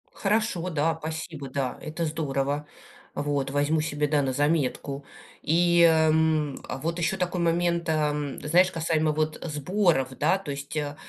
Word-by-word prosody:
Хорошо, 205 -4 0
да, 160 0 0
спасибо, 155 -3 -6
да, 130 -2 -2
это 160 +2 -3
здорово. 145 -1 -2 0.5
Вот. 145 -2 -1
Возьму 145 +2 +1
себе, 150 -1 -1
да, 145 0 +2
на 135 -1 -1
заметку. 145 -1 0 0.4
И, 170 +2 +3
эм, 160 -2 +3 0.3
вот 170 +2 -2
еще 190 +3 0
такой 180 -1 -1
момент, 170 0 +1
эм, 150 -2 -1
знаешь, 180 +5 +4
касаемо 160 -2 +1
вот 155 +1 -1
сборов, 155 -2 +1
да, 160 +6 +3
то 180 -7 -6
есть, 140 +2 -6
а, 145 -1 -2
155 Hz, 145 wpm, -26 LUFS, 145-170 Hz, 0.5 s, знаешь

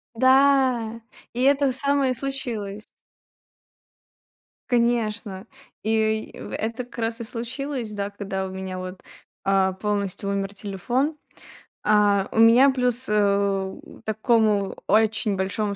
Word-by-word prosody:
Да, 260 -3 +3 0.3
и 245 - -3
это 275 0 +3
самое 280 0 +1
случилось. 230 -6 -5 1.8
Конечно, 230 -5 0 0.4
и 220 0 0
в - - -8
это 230 +3 -3
как 245 - -15
раз 230 0 -2
и - - -3
случилось, 240 +1 -4
да, 200 -1 -3
когда 195 -1 -4
у - - -7
меня 190 0 -5
вот, 185 0 -8 0.4
а, 195 -1 +2
полностью 200 0 -2
умер 200 0 -3
телефон. 240 - -2 0.7
А, 205 -2 +3
у - - -1
меня 235 +5 +7
плюс, 250 -1 0
э, 200 -2 +1 0.3
такому 215 -2 +1
очень 215 0 +2
большому 200 +2 -1
220 Hz, 115 wpm, -24 LUFS, 200-245 Hz, 1.8 s, меня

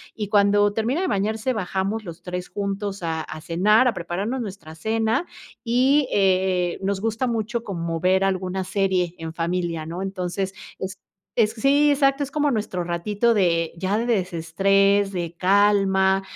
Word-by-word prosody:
y 210 -2 -3
cuando 205 0 +4
termina 235 - 0
de 375 - 0
bañarse, 220 - -1
bajamos 195 +1 -2
los 170 0 -9
3 180 0 -5
juntos 200 -1 -4
a 160 -1 -2
a 155 - -8
cenar, 210 +10 +3
a 240 - +2
prepararnos 195 +9 -3
nuestra 190 -7 -8
cena 220 - 0 0.4
y, 260 +4 +3
eh, 185 -2 +2
nos 195 0 -1
gusta 225 +3 -1
mucho 230 0 -2
como 170 -5 -3
ver 185 +2 +2
alguna 190 0 -1
serie 185 -2 0
en 160 -1 -6
familia, 170 -1 -2
¿no? 170 +3 -5
Entonces, 190 0 -3 0.3
es 190 0 -5 0.4
es 220 -2 +2
sí, 280 +5 +3
exacto, 275 -1 +2
es 280 - -2
como 290 0 +1
nuestro 210 -6 -2
ratito 205 +7 0
de 170 -5 +1
ya 190 +4 -1
de 230 - -1
desestrés, 195 0 +2
de 175 -3 -4
calma, 195 0 +3
195 Hz, 160 wpm, -23 LUFS, 180-220 Hz, 0.4 s, cuando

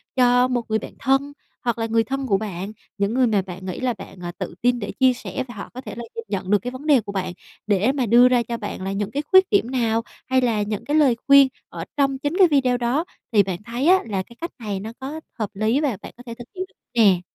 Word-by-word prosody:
cho 250 0 +4
một 250 -2 0
người 220 0 +1
bạn - - -9
thân, 275 +2 +1 0.3
hoặc 235 -2 0
là 225 - -1
người 225 0 +2
thân 270 +3 -3
của 195 -4 +3
bạn, 195 -1 -5 0.3
những 200 +2 0
người 255 0 +3
mà 210 -4 +2
bạn 185 0 -9
nghĩ 185 -2 -4
là 255 -2 0
bạn, 195 -3 -11
à, 175 - -4
tự - - -5
tin 245 0 +2
để 205 - -4
chia 260 -1 +3
sẻ 210 -2 -5
và 240 - -9
họ 200 - -7
có 255 - -7
thể - - -8
là 235 - -6
dưng 460 0 -5
nhận 190 0 -3
được 205 - +5
cái 245 +6 -5
vấn 260 +4 -9
đề 280 -5 +5
của 200 - -7
bạn, 185 -2 -3 0.3
để 205 +5 +3
mà 270 -3 -1
đưa 240 +3 +7
ra 245 -2 +3
cho 235 0 -4
bạn 205 -3 -6
là 195 +1 -3
những 205 +1 -2
cái 290 +2 -2
khuyết 375 0 +7
điểm 330 - +2
nào 230 -3 +1 0.3
hay 260 0 +3
là 225 -4 +1
những 210 0 -3
cái 295 - 0
lời 275 -6 +5
khuyên 275 -1 +8 0.2
ở - - -6
trong 275 -1 +2
chính 290 +6 -2
cái 375 -3 +7
video 260 -5 +2
đó. 245 +7 0 0.3
Thì 205 -3 +5
bạn 185 0 -5
thấy 240 +7 -2
á, 375 +1 +7
là 195 -3 -2
cái 235 - -17
cách 335 - -4
này 205 -4 -3
nó 220 +3 -6
có 285 +4 -5 0.2
hợp 215 -2 -1
lý 220 +7 +1
và 260 -10 0
bạn - - -10
có 245 - -12
thể 235 - -5
thực 240 0 -10
hiện 370 - -3 0.3
nè? 200 -6 +5
240 Hz, 275 wpm, -22 LUFS, 205-265 Hz, 0.3 s, khuyên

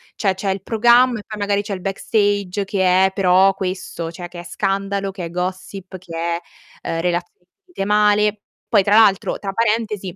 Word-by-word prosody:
cioè 195 -3 +1
c'è 195 +1 -4
il 190 0 -2
programma, 240 +1 +4
e - - -10
poi 215 -1 -7
magari 205 0 0
c'è 205 -1 -5
il 185 - -9
backstage 200 0 -1
che 190 -1 +3
è 190 - +1
però 190 0 +4
questo, 185 -3 -5
cioè 175 +1 -8
che 175 0 -10
è - - -8
scandalo, 195 +2 -2
che 190 -3 -6
è 165 - -6
gossip, 185 +1 -5
che 170 -2 -10
è, 170 +1 -2 0.5
eh, 165 0 -2
relazioni 175 0 -3 0.2
finite 355 - -5
male. 210 0 +2 0.3
Poi 210 -4 +4
tra 205 +2 +3
l'altro, 210 -4 +4
tra 195 -1 -5
parentesi, 215 -4 -1
195 Hz, 190 wpm, -20 LUFS, 180-210 Hz, 0.5 s, programma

